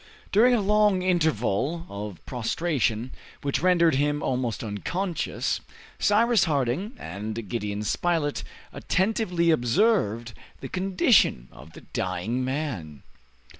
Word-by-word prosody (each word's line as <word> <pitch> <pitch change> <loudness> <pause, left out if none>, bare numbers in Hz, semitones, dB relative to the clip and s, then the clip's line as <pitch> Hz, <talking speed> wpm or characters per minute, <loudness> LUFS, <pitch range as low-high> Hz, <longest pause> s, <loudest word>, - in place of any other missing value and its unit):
During 240 +5 +5
a 225 - +1
long 205 -2 +3
interval 160 - 0
of 100 -3 -7
prostration, 125 -2 -1 0.3
which 140 -1 0
rendered 170 -3 +4
him 145 +2 0
almost 125 -4 -1
unconscious, 160 - -2 0.4
Cyrus 220 -1 +4
Harding 145 - -1
and 110 +2 -6
Gideon 105 -1 -3
Spilett 160 +4 0 0.3
attentively 180 -4 +1
observed 120 - +1 0.3
the - - -7
condition 185 - +2
of 80 +6 -14
the - - -12
dying 95 +8 -3
man. 125 - -4
145 Hz, 105 wpm, -26 LUFS, 110-185 Hz, 0.4 s, During